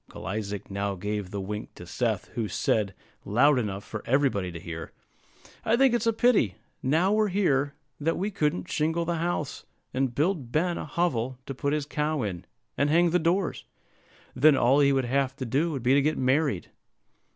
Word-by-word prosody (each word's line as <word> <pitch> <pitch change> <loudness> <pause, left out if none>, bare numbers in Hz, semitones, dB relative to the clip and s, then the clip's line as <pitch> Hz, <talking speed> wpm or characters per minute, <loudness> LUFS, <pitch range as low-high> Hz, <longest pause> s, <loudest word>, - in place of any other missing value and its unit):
Uncle - - -10
Isaac 100 0 -4
now 100 0 -2
gave 105 0 -3
the 100 - -4
wink 105 +2 -5
to - - -10
Seth, - - -2
who 115 -3 -3
said, 100 +1 0 0.3
loud 130 +7 +4
enough 100 -4 -3
for 110 - -6
everybody 125 -9 +1
to 85 - -7
hear, 80 0 -7 0.7
"I 225 +1 +2
think 270 -1 +5
it's 230 -1 +1
a - - +5
pity, 220 - +3 0.3
now 165 +9 +2
we're 215 0 +3
here, 145 -8 +1 0.2
that 160 +3 0
we 200 +4 -1
couldn't 150 - -1
shingle 160 +2 0
the 170 0 -1
house, 165 -3 -2 0.3
and 130 -2 0
build 150 -5 0
Ben 170 +4 +1
a - - -4
hovel 130 -7 -1
to 135 - -5
put 140 +2 -1
his 150 -2 -1
cow 150 -1 -1
in, 90 -5 -4 0.3
and 140 - +1
hang 170 +2 +4
the 180 - +3
doors; 175 +3 0 0.7
then 140 +2 +5
all 130 +4 +4
he 140 -1 +5
would 135 -2 +1
have 135 +1 0
to 130 - -5
do 140 +8 +1
would 135 -5 -4
be 125 +2 +4
to 140 - +5
get 155 +2 +1
married." 130 - +1
140 Hz, 195 wpm, -27 LUFS, 110-165 Hz, 0.7 s, think